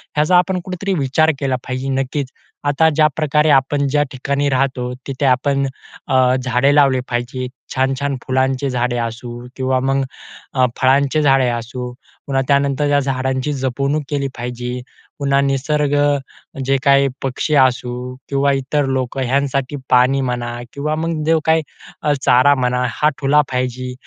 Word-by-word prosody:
ह्याचा 155 +4 +4
आपण 180 +1 +2
कुठेतरी 185 +1 -3
विचार 145 +4 +2
केला 135 -2 0
पाहिजे 130 +1 -3
नक्कीच. 135 +1 -3 0.4
आता 145 +3 +3
ज्याप्रकारे 155 0 +2
आपण 140 +1 +3
ज्या 145 +2 +2
ठिकाणी 140 +2 -1
राहतो 130 -2 -1
तिथे 135 0 -2
आपण 135 +2 +2 0.4
अ, 130 -1 +3
झाडे 130 +3 +2
लावले 135 -3 +4
पाहिजे, 120 +1 -3 0.3
छान-छान 135 +1 0
फुलांचे 130 +1 0
झाडे 125 -1 -1
असू 120 +1 -5
किंवा 130 -1 0
मग 135 +1 +1 0.5
अ, 130 -1 +3
फळांचे 140 +3 +3
झाडे 135 -3 +4
असू. 120 +1 -4 0.3
पुन्हा 135 -1 +1
त्यानंतर 140 0 +2
या 145 0 +3
झाडांची 130 +1 -1
जपवणूक 140 +3 -1
केली 140 -2 -1
पाहिजे. 125 +1 -4 0.4
पुन्हा 140 -1 +2
निसर्ग 140 +2 0 0.7
जे 135 +1 +2
काही 140 -1 +5 0.2
पक्षी 135 +3 -1
असू 125 -1 +1
किंवा 140 0 +2
इतर 135 +2 0
लोकं 130 0 -2
ह्यांसाठी 135 +1 0
पाणी 130 +2 +4
म्हणा 120 -2 -3
किंवा 150 +2 -2
मग 160 0 -2
जो 165 0 +4
काही 160 0 +3 0.4
अ, 150 - +2
चारा 130 +3 +5
म्हणा. 125 -1 0
हा 150 +5 +1
ठेवला 145 +1 +4
पाहिजे, 125 0 -2
135 Hz, 145 wpm, -18 LUFS, 125-145 Hz, 0.7 s, काही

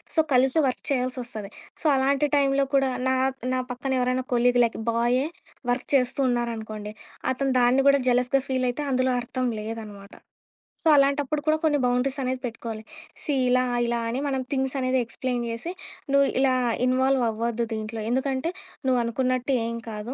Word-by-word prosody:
So, 320 - +3 0.2
కలిసి 260 +4 +3
work 255 - -3
చేయాల్సొస్తది. 250 -5 -3 0.3
So, - - -11
అలాంటి 275 +2 +2
టైంలో 275 0 +3
కూడా 275 - +5 0.3
నా 260 - +3 0.4
నా 255 - +1
పక్కన 250 +2 -4
ఎవరైనా 255 +1 0
కొలీగ్ 245 0 +3
లైక్ 230 - 0
బాయే 240 +3 +2 0.5
వర్క్ 245 - -2
చేస్తూ 255 +1 +1
ఉన్నారనుకోండి, 220 -3 -3 0.4
అతను 270 +1 -1
దాన్ని 245 +2 +4
కూడా 280 0 +5
జలస్‌గా 250 +2 +2
ఫీలయితే 255 +2 0
అందులో 255 0 +2
అర్థం 255 +1 -3 0.2
లేదనమాట. 210 -2 -8 0.7
సో, - - -1
అలాంటప్పుడు 280 +1 +2
కూడా 310 0 +4
కొన్ని 305 -2 +3
బౌండరీస్ 250 +2 +1
అనేది 255 0 -1
పెట్టుకోవాలి. 225 -1 -6 0.4
సీ 295 - -1 0.2
ఇలా 255 0 +4 0.2
ఇలా 235 0 0
అని 250 +3 -2
మనం 265 -2 -1
థింగ్స్ 265 -1 -1
అనేది 255 0 +1
ఎక్స్‌ప్లెయిన్ 245 +1 -3
జేసి 235 +10 -4 0.4
నువ్వు 280 0 +5
ఇలా 265 -1 +3 0.3
ఇన్వాల్వ్ 260 0 +2
అవ్వద్దు 230 +1 -1
దీంట్లో. 220 +1 -4
ఎందుకంటే, 265 +4 0 0.4
నువ్వు 255 -2 +3
అనుకున్నట్టు 255 +2 0
ఏం 230 0 -3
కాదు. 215 +3 -5
255 Hz, 155 wpm, -25 LUFS, 235-270 Hz, 0.7 s, కూడా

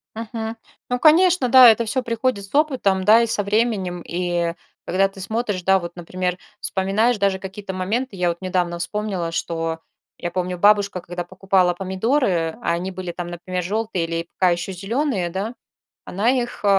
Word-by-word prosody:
Мгм. 225 0 -5 0.3
Ну, 250 - +1
конечно, 330 -3 +5
да, 255 -1 +10
это 225 +1 +3
всё 260 +4 0
приходит 230 -3 -1
с 195 - -10
опытом, 255 -11 +2
да, 220 +4 +6
и 235 - +1
со 205 -2 -1
временем. 200 -4 0
И 175 -1 -1 0.3
когда 190 +2 +2
ты 195 - -14
смотришь, 205 -1 -2
да, 190 +1 +4
вот, 170 0 -7
например, 180 +1 -3 0.2
вспоминаешь 210 +5 +1
даже 200 -1 +1
какие-то 190 0 -7
моменты. 210 +6 -2
Я 180 -2 +1
вот 170 - -2
недавно 180 -2 -1
вспомнила, 185 -2 -2
что 165 -1 -2 0.4
я 175 - -4
помню 180 0 -2
бабушка, 200 -1 +3
когда 175 +1 -5
покупала 185 -1 +1
помидоры, 190 - 0
а - - 0
они 180 +3 -3
были 185 -1 -5
там, 175 0 -6
например, 180 +1 -4
жёлтые 205 -2 -1
или 165 0 -3
пока 185 -2 +4
ещё 175 +2 -2
зеленые, 200 - -1
да, 200 +7 -4 0.5
она 210 +6 +1
их 245 -4 -2
190 Hz, 170 wpm, -22 LUFS, 175-225 Hz, 0.5 s, да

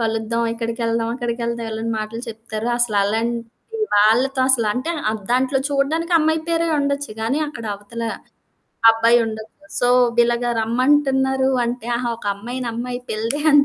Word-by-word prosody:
కలుద్దాం. 225 +1 -1
ఇక్కడికెళ్దాం, 230 0 -1
అక్కడికెళ్దాం 235 -1 -3
ఎళ్ళని 225 +1 -3
మాటలు 215 +2 -5
చెప్తారు. 225 0 -5
అసలలాంటి 225 +1 0 0.5
వాళ్ళతో 245 +6 +3
అసలంటే 250 +4 +1 0.2
ఆహ్, 220 -1 -4
దాంట్లో 260 +2 +2
చూడడానికి 300 +5 0
అమ్మాయి 315 0 +2
పేరే 335 0 +1
ఉండొచ్చు. 280 -2 -1
కానీ 265 +7 0
అక్కడ 235 -6 -8
అవతల 220 +3 -7 0.9
అబ్బాయుండొచ్చు. 225 -1 +2 0.3
సో, 245 - +3 0.3
ఇలాగ 240 0 +3 0.2
రమ్మంటున్నారు 265 +2 +2 0.2
అంటే 235 -1 -4
ఆహా! 240 0 -2
ఒక 225 - -10
అమ్మాయి 240 +5 -6
నమ్మాయి 245 +2 -4
పిల్డే 230 +7 -2
అని 290 0 +7
235 Hz, 130 wpm, -21 LUFS, 225-265 Hz, 0.9 s, అని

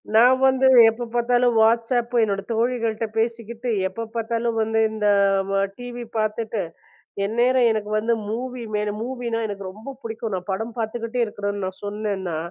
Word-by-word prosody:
நான் 250 +3 +7
வந்து 265 0 +3 0.2
எப்ப 235 +2 -4
பார்த்தாலும் 245 0 +3
WhatsApp 235 +2 +2
என்னோட 200 -2 0
தோழிகள்கிட்ட 230 -1 0
பேசிக்கிட்டு, 230 +1 -2 0.2
எப்ப 230 +5 -5
பார்த்தாலும் 230 0 -1
வந்து 225 0 +1
இந்த 215 -1 -1 0.7
டிவி 245 0 -7
பார்த்துட்டு, 215 0 -1 0.6
எந்நேரம் 240 +3 +3
எனக்கு 215 -1 -2
வந்து 235 +2 +1 0.2
மூவி 250 +2 -4
மேல, 210 0 0
மூவின்னா 240 -2 -3
எனக்கு 200 -1 -6
ரொம்ப 220 +8 -9
பிடிக்கும். 225 -1 -4
நான் 185 +2 -6
படம் 225 +4 -3
பார்த்துக்கிட்டே 230 +2 -2
இருக்கறேன்னு 205 -1 -4
நான் 185 - -9
சொன்னேன்னா, 200 -5 -3
230 Hz, 140 wpm, -23 LUFS, 215-240 Hz, 0.7 s, நான்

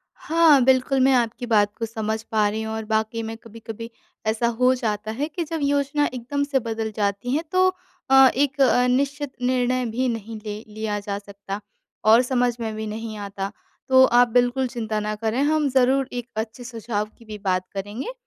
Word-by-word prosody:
हाँ, 320 -4 +4
बिल्कुल। 265 +1 +3
मैं 265 +1 +5
आपकी 240 0 0
बात 210 -3 +2
को 230 - -2
समझ 220 0 -3
पा 215 -1 +3
रही 220 +1 -3
हूँ। 220 0 -4
और 220 -1 -4
वाक़ई 220 +1 -1
में 225 0 -5
कभी-कभी 230 0 -9 0.4
ऐसा 225 +2 +1
हो 255 +1 +5
जाता 215 -3 -2
है 280 +7 -2
कि 335 +2 -4
जब 325 0 -4
योजना 285 +1 +1
एक 250 - -5
दम 285 0 +1
से 280 -2 +1
बदल 225 -2 -3
जाती 205 +3 -1
है 320 - 0
तो 370 0 +4 0.4
अ, 270 0 +8
एक 280 +1 0
अ, 250 -1 +4
निश्चित 280 +2 0
निर्णय 250 0 +1
भी 245 +3 -1
नहीं 225 -1 -5
ले 210 +1 -5
लिया 215 -1 -2
जा 200 0 -4
सकता 200 0 -7 0.5
और 225 +3 +8
समझ 245 -1 +1
में 220 -1 -3
भी 220 0 -4
नहीं 220 0 -5
आता। 200 0 -5 0.4
तो 260 0 +7
आप 245 0 +5
बिल्कुल 245 +2 +2
चिंता 220 -3 -3
ना 210 0 -2
करें 225 +4 -1
हम 305 -1 +2
ज़रूर 260 +1 +3
एक 245 -1 -4
अच्छे 220 +2 -4
सुझाव 225 -3 -3
की 230 - -17
भी 215 -1 -7
बात 185 -1 +1
करेंगे। 205 - -5
230 Hz, 195 wpm, -23 LUFS, 220-260 Hz, 0.5 s, अ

